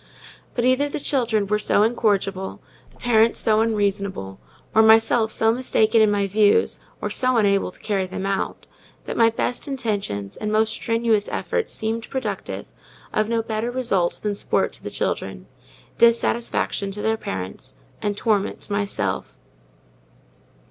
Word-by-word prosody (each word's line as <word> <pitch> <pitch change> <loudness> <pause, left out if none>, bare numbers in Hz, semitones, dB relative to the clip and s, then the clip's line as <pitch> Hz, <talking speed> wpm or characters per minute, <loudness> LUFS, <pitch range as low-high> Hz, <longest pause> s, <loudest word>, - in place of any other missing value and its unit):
But 240 - 0
either 260 +3 +3
the - - -4
children 235 -7 0
were 210 +1 0
so 210 0 +3
incorrigible, 200 -4 0 0.3
the - - -25
parents 230 -1 +3
so 220 -1 +3
unreasonable, 200 - -1 0.3
or 220 - +6
myself 220 0 +4
so 225 0 +3
mistaken 225 -2 +2
in 215 - +5
my 205 -1 +1
views, 205 +1 +3 0.2
or - - -3
so 255 -1 +2
unable 200 -3 +2
to - - -14
carry 195 -3 -1
them 190 +1 -5
out, 195 0 -2 0.4
that - - -4
my 230 -1 +5
best 245 +4 -2
intentions 205 - -3
and 210 - -3
most 215 0 +2
strenuous 230 -2 0
efforts 465 - -2
seemed 225 0 -3
productive 265 -1 -4 0.5
of 215 0 +1
no 230 -1 0
better 220 +1 -2
result 235 -9 0
than 210 -1 0
sport 200 - 0
to - - -7
the - - -4
children, - - -3 0.5
dissatisfaction 235 -3 +2
to 210 - -6
their 220 0 +2
parents, 95 - -6 0.3
and 205 -1 -2
torment 210 -3 0
to - - -5
myself. 200 - -2
220 Hz, 150 wpm, -22 LUFS, 200-230 Hz, 0.5 s, or